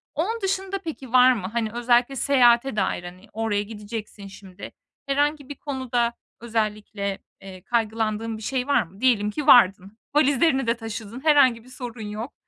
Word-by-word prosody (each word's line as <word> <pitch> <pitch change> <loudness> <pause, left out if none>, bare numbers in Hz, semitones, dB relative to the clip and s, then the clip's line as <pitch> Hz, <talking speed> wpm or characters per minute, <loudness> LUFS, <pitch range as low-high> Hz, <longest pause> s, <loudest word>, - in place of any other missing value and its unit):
Onun 430 +10 -2
dışında 385 0 -2
peki 295 -8 -8
var 255 0 +7
mı? 200 -6 -4
Hani 225 -2 -1
özellikle 240 +2 +2
seyahate 250 -2 +3
dair 190 -3 -1
hani 180 +3 -11
oraya 220 -2 -1
gideceksin 210 -1 -8
şimdi 195 -1 -11 0.3
herhangi 290 0 0
bir 285 - -6
konuda 250 -4 -2 0.3
özellikle, 215 -3 -3 0.2
eee, 190 -1 -11
kaygılandığın 225 -1 -1
bir 220 - -10
şey 260 +2 -2
var 285 - +3
mı? 185 +4 -17
Diyelim 220 -5 +2
ki 290 +6 -5
vardın, 195 -3 +5 0.2
valizlerini 275 -2 +3
de 230 +1 +1
taşıdın, 225 +2 -7
herhangi 270 -7 +4
bir 250 - -18
sorun 245 -3 -8
yok. 215 +4 -6
235 Hz, 160 wpm, -24 LUFS, 210-270 Hz, 0.3 s, var